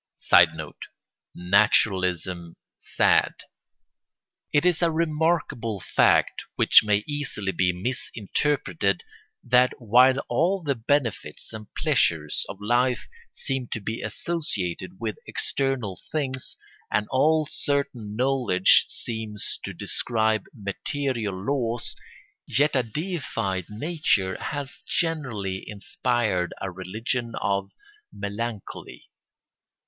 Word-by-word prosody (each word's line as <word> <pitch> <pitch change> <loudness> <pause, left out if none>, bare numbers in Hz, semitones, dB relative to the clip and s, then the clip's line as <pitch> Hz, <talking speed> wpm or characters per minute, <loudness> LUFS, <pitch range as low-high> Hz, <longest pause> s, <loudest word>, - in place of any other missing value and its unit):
[Sidenote: 80 -3 +3 0.5
Naturalism 90 -2 +2 0.2
sad.] - - +2 1.2
It 145 +3 +3
is 180 -2 +3
a 170 - +4
remarkable 155 - 0
fact, - - +3
which - - +7
may 105 -1 +2
easily 145 -9 -2
be 90 0 +2
misinterpreted, 100 - -1 0.4
that 125 +1 +4
while 125 +3 +5
all 185 +2 +1
the 145 -3 +1
benefits 115 - -2
and 110 -2 -9
pleasures 75 -3 +1
of 100 - -7
life 120 +4 +1 0.2
seem 135 -2 -3
to - - -3
be 110 +2 -4
associated 95 - -3
with 110 -2 -3
external 130 -9 -2
things, 130 -4 -2 0.3
and 105 - +1
all 155 +4 +3
certain 140 -8 -2
knowledge 125 -7 +4
seems 110 -3 -4
to - - -4
describe 110 -3 0
material 110 0 -3
laws, 120 -4 -1 0.5
yet 145 +2 +3
a 130 - +4
deified 115 - -3
nature 105 - 0
has 145 -2 -4
generally 120 - -2
inspired 105 -3 -1
a 95 - -4
religion 115 +6 -3
of 100 -1 0 0.4
melancholy. 100 +2 -6
115 Hz, 100 wpm, -25 LUFS, 100-135 Hz, 1.2 s, which